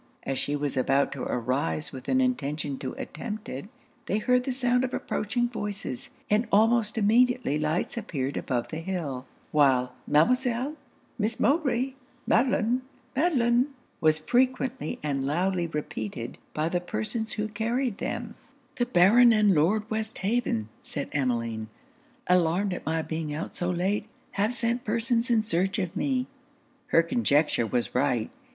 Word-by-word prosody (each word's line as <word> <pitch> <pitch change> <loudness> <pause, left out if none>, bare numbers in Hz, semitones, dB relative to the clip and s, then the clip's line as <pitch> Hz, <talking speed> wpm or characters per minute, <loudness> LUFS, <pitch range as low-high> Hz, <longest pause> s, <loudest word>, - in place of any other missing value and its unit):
As 135 -1 -2
she 145 - -1
was 145 -1 -2
about 135 +2 +2
to 140 - -5
arise 115 - -1
with 130 -1 -9
an 260 - +3
intention 150 - -1
to 130 - -4
attempt 210 0 -6
it, 135 +6 -5 0.4
they 200 - +1
heard 250 +3 +2
the 265 - -1
sound 250 -1 +2
of 260 - -1
approaching 240 +3 -1
voices, 205 - -5 0.2
and 215 +2 +2
almost 220 +1 +3
immediately 230 - +3
lights 155 +8 -1
appeared 145 - -3
above 120 -3 -2
the 160 - -4
hill, 165 -8 -4 0.2
while 130 -4 +3
'Mademoiselle! 250 - +2 0.5
Miss 220 +1 -1
Mowbray! 270 -4 +2 0.3
Madelon! 245 0 +2 0.3
Madelon!' 255 -5 +3 0.3
was 155 -2 +4
frequently 255 +3 0
and 135 -2 -1
loudly 175 +3 +1
repeated 115 -7 -5 0.2
by 155 +1 +1
the 175 +1 0
persons 180 - -3
who 215 0 -2
carried 230 +2 -1
them. - - -3 0.4
'The 245 - +1
Baron 235 +4 +6
and 210 -3 +5
Lord 200 +8 +2
Westhaven,' 220 - -1
said 140 - -5
Emmeline, 115 -5 -1 0.6
'alarmed 180 +2 +2
at - - -7
my 160 0 0
being 160 -2 -3
out 155 - -5
so 175 - -1
late, 190 +4 0 0.2
have 205 +3 +1
sent 235 +1 -1
persons 230 +2 0
in 225 -2 +3
search 190 -1 0
of 185 -5 -2
me.' 260 -3 0 0.6
Her 165 - +5
conjecture 155 - +2
was 120 +2 -1
right. 125 -4 +1
195 Hz, 145 wpm, -27 LUFS, 145-240 Hz, 0.6 s, Baron